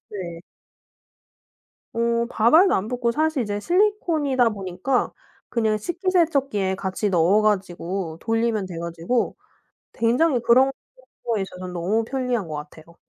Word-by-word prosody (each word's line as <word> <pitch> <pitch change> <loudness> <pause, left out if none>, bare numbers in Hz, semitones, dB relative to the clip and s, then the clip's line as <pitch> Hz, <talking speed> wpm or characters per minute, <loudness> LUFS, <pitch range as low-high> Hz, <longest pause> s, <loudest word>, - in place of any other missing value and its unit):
네. 175 -5 -7 1.5
어 235 0 +1
밥알도 315 - +5
안 195 +3 -1
붙고 245 -1 0
사실 310 -1 +1
이제 205 -2 -3
실리콘이다 330 - +2
보니까 200 +5 -2 0.4
그냥 220 -2 +1
식기세척기에 290 - 0
같이 195 +2 -2
넣어 185 +4 +3
가지고 185 -4 -1
돌리면 225 -2 0
돼 180 -3 -7
가지고 170 +8 -2 0.6
굉장히 245 +4 +2
그런 255 +3 +4 0.5
거에 225 -4 0
있어서 185 -1 -7
너무 190 +6 0
편리한 250 -4 -2
것 155 - -6
같아요. 155 +2 -9
225 Hz, 280 characters per minute, -23 LUFS, 190-260 Hz, 1.5 s, 밥알도